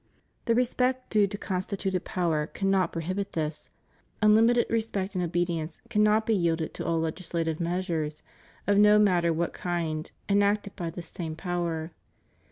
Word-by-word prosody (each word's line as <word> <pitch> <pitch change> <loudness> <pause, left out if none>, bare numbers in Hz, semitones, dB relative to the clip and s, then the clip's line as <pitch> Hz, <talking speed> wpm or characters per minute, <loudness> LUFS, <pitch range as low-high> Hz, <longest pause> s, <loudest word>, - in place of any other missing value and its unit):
The 230 - +3
respect 255 +1 0
due 210 -2 +4
to 205 +1 -5
constituted 190 -1 -2
power 160 -4 0
cannot 195 -2 +1
prohibit 185 +5 -3
this: 155 -1 -3 0.5
unlimited 225 +3 +5
respect 220 -4 -1
and 180 -2 -1
obedi 175 0 0
ence 155 +1 -7
cannot 215 0 +3
be 225 - +2
5delded 165 -2 0
to - - -5
all 165 -1 +1
legislative 165 -1 -2
measures, 170 -3 -2 0.4
of 200 0 +3
no 210 0 +7
matter 180 -5 +3
what 165 +1 -1
kind, 165 -3 -3 0.2
enacted 200 0 +2
by 170 -2 -3
this 170 +1 -7
same 160 -1 -5
power. 170 -2 -3
180 Hz, 150 wpm, -28 LUFS, 165-205 Hz, 0.5 s, no